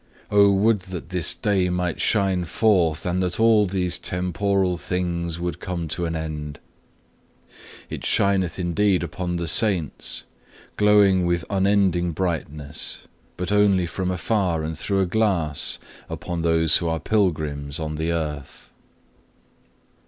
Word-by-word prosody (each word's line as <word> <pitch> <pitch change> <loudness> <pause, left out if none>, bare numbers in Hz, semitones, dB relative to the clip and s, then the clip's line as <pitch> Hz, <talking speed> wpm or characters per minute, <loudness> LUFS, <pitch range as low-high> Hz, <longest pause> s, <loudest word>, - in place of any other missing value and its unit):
Oh 100 -1 +6
would 105 +2 +3
that 90 -3 -7
this 90 -3 +1
day 95 -3 +1
might 90 -1 -2
shine 95 -4 +1
forth, 85 -5 +2
and 90 +1 0
that 90 +1 -2
all 110 -2 +5
these 90 -2 -2
temporal 90 +1 0
things 85 -1 -3
would 85 0 -3
come 85 -2 -4
to 85 +3 -2
an 80 - -3
end. 75 -2 -5 1.3
It - - -7
shineth 95 -4 +1
indeed 90 +1 +1
upon 90 +1 -4
the 85 -1 -2
Saints, 85 - +1 0.5
glowing 100 -3 +4
with 85 -1 0
unending 95 -3 +2
brightness, 75 -4 -3 0.3
but 90 +1 -3
only 100 -3 +3
from 90 +2 -3
afar 90 -2 0
and 80 +1 -3
through 95 +5 0
a - - +2
glass, 90 -7 0 0.3
upon 85 -2 -4
those 80 -1 +3
who 85 - -3
are 80 0 -1
pilgrims 75 -6 -1
on 80 -1 -3
the 80 +2 -1
earth. 75 -4 -5
90 Hz, 135 wpm, -23 LUFS, 80-95 Hz, 1.3 s, Oh